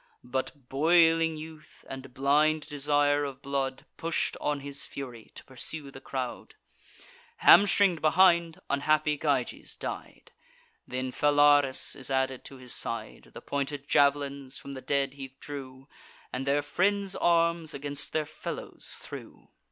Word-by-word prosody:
But 130 +1 -4
boiling 165 +2 +4
youth, 155 0 -12
and 135 0 -8
blind 150 +4 +2
desire 145 -1 +2
of 140 -2 -6
blood, 135 -1 -2
Push'd 165 0 -1
on 145 -1 -1
his 140 0 -4
fury, 125 -5 -8
to - - -6
pursue 140 +2 -6
the 135 - -11
crowd. 130 -2 -5 0.8
Hamstring'd 200 -4 +6
behind, 170 0 +4
unhappy 150 +2 +2
Gyges 140 -5 -1
died; - - -7 0.6
Then 130 0 -3
Phalaris 145 -1 +4
is 135 - -7
added 130 -1 0
to 135 - -9
his 125 -1 -8
side. - - -5
The - - -8
pointed 140 0 -3
jav'lins 140 -1 +2
from 140 - -9
the 130 -1 -7
dead 140 0 0
he 135 -1 -9
drew, 135 -2 -8 0.5
And 130 +2 -3
their 145 +1 +2
friends' 200 0 0
arms 170 -1 +2
against 145 +1 -5
their 155 -1 0
fellows 155 - -5
threw. - - -10
145 Hz, 135 wpm, -29 LUFS, 135-155 Hz, 0.8 s, Hamstring'd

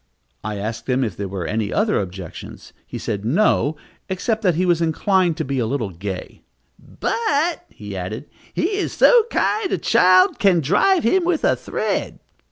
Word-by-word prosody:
I 105 0 -4
asked 110 +4 -5
him 130 +1 +2
if 105 -7 -3
there 100 - -4
were 95 -2 -5
any 110 +1 -2
other 210 +1 +1
objections. 90 -2 -9
He - - -6
said 100 -1 -4
no, 150 - +2 0.3
except 215 +4 -1
that 180 -6 +2
he 180 +3 +1
was 175 -2 +2
inclined 175 +1 +1
to 160 - -2
be 135 -1 -2
a 115 - 0
little 115 -6 -2
gay; 95 +2 -7 0.4
"but," 335 -6 -1
he 105 -2 -9
added, 95 +8 -5 0.3
"he 350 - -1
is 405 - -2
so 480 -3 +5
kind, 420 -3 0
a - - +1
child 185 -5 +4
can 195 -6 +4
drive 210 - +2
him 355 +11 +3
with 340 -2 0
a - - +3
thread." - - -3
160 Hz, 175 wpm, -21 LUFS, -, 0.4 s, so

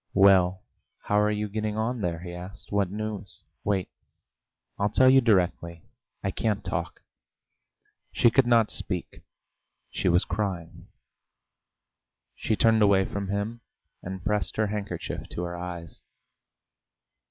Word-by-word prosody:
"Well, 95 -1 +5 0.4
how 105 - +2
are 105 0 +3
you 105 0 -1
getting 105 +1 -3
on 115 +2 -1
there?" 85 -3 -2
he 90 -1 -7
asked. 90 +3 -9
"What 100 -2 +1
news?" 105 -1 -6 0.2
"Wait; 95 -3 0 0.9
I'll 100 +1 +2
tell 130 +5 +5
you 135 0 +6
directly.... 90 -6 +1 0.4
I 100 - 0
can't 105 +1 -1
talk." - - -4 1.1
She 120 - +4
could 130 0 +4
not 115 -2 +4
speak; - - -3 0.7
she - - 0
was 85 +1 +3
crying. 90 -3 -4 1.5
She 110 - -1
turned 110 0 +4
away 100 -2 +5
from 100 0 -4
him, 100 +4 -3 0.4
and 95 0 -7
pressed 105 -1 -1
her 110 - +2
handkerchief 105 -1 -4
to 90 - -4
her 85 0 -4
eyes. 85 -2 -7
100 Hz, 130 wpm, -27 LUFS, 90-110 Hz, 1.5 s, you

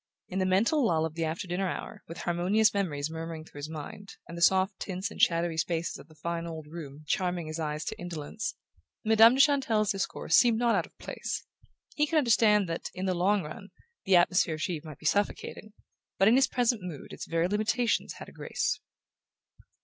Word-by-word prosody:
In 190 - -2
the 185 - +1
mental 225 +11 +3
lull 160 -7 +2
of 160 - -4
the 165 0 -2
after 165 +5 -3
dinner 185 +2 -1
hour, - - -6
with 165 - -7
harmonious 185 +6 +2
memories 160 -7 -1
murmuring 160 -1 -6
through 145 - -12
his 145 +2 -5
mind, 160 +6 -8
and 170 - -8
the 170 - -6
soft 190 +3 +3
tints 190 0 -4
and - - -6
shadowy 170 -1 +3
spaces 165 +1 -1
of - - -13
the 155 - -19
fine 170 +1 -3
old 160 -2 -7
room 150 -2 -9
charming 180 +1 -1
his 155 +1 -5
eyes 150 0 -3
to - - -5
indolence, 175 +3 -5 0.5
Madame 225 +2 +7
de - - -2
Chantelle's 260 -8 +3
discourse 195 -1 0
seemed 235 -3 +5
not 235 0 +2
out 180 -5 +1
of - - -29
place. - - -5 0.5
He 300 0 +1
could 320 - +1
understand 215 -7 +4
that, 165 0 -4
in 185 +1 -3
the 185 - +1
long 190 +2 +2
run, 155 +6 -9 0.4
the 190 - +4
atmosphere 175 -2 +3
of 155 - -8
Givre 165 -5 -3
might 150 - -10
be - - -15
suffocating; 205 +3 -1 0.4
but 195 - +4
in 220 - +6
his 270 +1 +5
present 240 -3 +1
mood 175 -6 -8
its - - -7
very 165 +1 +1
limitations 215 +4 0
had - - -10
a - - -12
grace. - - -2
180 Hz, 205 wpm, -29 LUFS, 160-210 Hz, 0.5 s, Madame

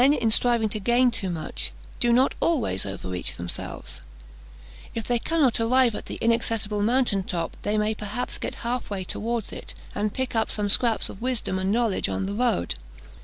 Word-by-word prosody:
Men, 275 +3 +6
in 230 -6 +1
striving 235 -1 +5
to 215 - -3
gain 240 +4 +3
too 225 -5 -2
much, 165 -3 -2 0.3
do 240 - +3
not 255 +3 +4
always 230 - +1
overreach 95 -2 -3
themselves; 85 0 -6 0.9
if 230 - -3
they 240 -1 +2
cannot 285 -5 +2
arrive 240 +1 +4
at - - -6
the - - -4
inaccessible 225 -2 +1
mountain 235 -2 +2
top, 170 -3 -3
they 210 +1 0
may 210 +1 +1
perhaps 215 +3 -4
get - - -4
half 245 +1 -2
way 195 -2 -3
towards 225 +4 -3
it, - - -8 0.2
and 210 0 -1
pick 260 +1 -3
up 220 -1 +1
some 205 -1 0
scraps 230 +2 +4
of 195 - -10
wisdom 245 -6 -1
and 190 +1 0
knowledge 225 -3 +1
on 195 - -2
the 200 - -3
road. 205 - +1
225 Hz, 185 wpm, -25 LUFS, 200-245 Hz, 0.9 s, Men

